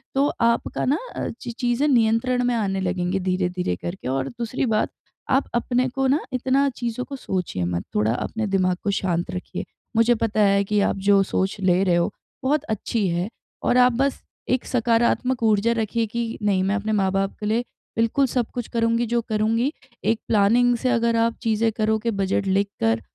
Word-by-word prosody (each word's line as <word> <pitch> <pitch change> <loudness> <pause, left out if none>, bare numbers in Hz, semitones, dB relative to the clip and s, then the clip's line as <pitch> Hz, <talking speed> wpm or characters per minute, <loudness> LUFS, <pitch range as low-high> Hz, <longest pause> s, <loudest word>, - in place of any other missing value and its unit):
तो 275 +1 +3
आपका 230 0 +1
ना 280 +5 +2 0.2
अ, - - -2
ची 240 - -5
चीजें 245 +3 0
नियंत्रण 245 0 +2
में 245 -1 +1
आने 195 -3 -1
लगेंगी 180 +1 -1
धीरे-धीरे 180 - -1
करके 175 - -6
और 135 0 -1
दूसरी 240 +2 -3
बात 220 -3 +1 0.4
आप 265 +1 +2
अपने 250 +2 +1
को 270 +1 0
ना 285 +4 +3
इतना 265 +2 +2
चीज़ों 240 +1 -3
को 280 - -7
सोचिए 180 - -3
मत। 85 0 -2
थोड़ा 105 +2 +2
अपने 220 - -3
दिमाग 185 -2 +1
को 205 - +1
शांत 175 -3 -1
रखिए, 180 - -5 0.3
मुझे 230 +1 +5
पता 220 -1 0
है 200 -1 +4
कि 210 +1 0
आप 195 - +1
जो 200 -1 +6
सोच 190 +1 -1
ले 185 0 +3
रहे 180 -3 +3
हो, 170 - +1 0.3
बहुत 290 +2 +1
अच्छी 215 -1 -1
है 175 +4 -1 0.3
और 245 - +3
आप 250 -1 +5
बस 275 0 0 0.3
एक 255 0 +1
सकारात्मक 240 +1 +1
ऊर्जा 220 +1 +3
रखिए 225 0 0
कि 230 +1 -3
नहीं 195 -2 +2
मैं 195 +2 +1
अपने 215 +1 -2
माँ-बाप 195 -1 +1
के 210 - -5
लिए 225 +3 +1 0.4
बिल्कुल 230 +5 +2
सब 245 -2 -1
कुछ 245 -2 -3
करूँगी 230 0 +1
जो 235 +1 +1
करूँगी। 225 +5 +1 0.3
एक 225 0 +2
प्लानिंग 235 +4 +4
से 255 - -1
अगर 235 -1 +2
आप 230 0 +2
चीज़ें 225 0 +2
करोगे 220 +1 +1
बजट 195 0 0
लिखकर 190 - +1
220 Hz, 185 wpm, -23 LUFS, 195-240 Hz, 0.4 s, जो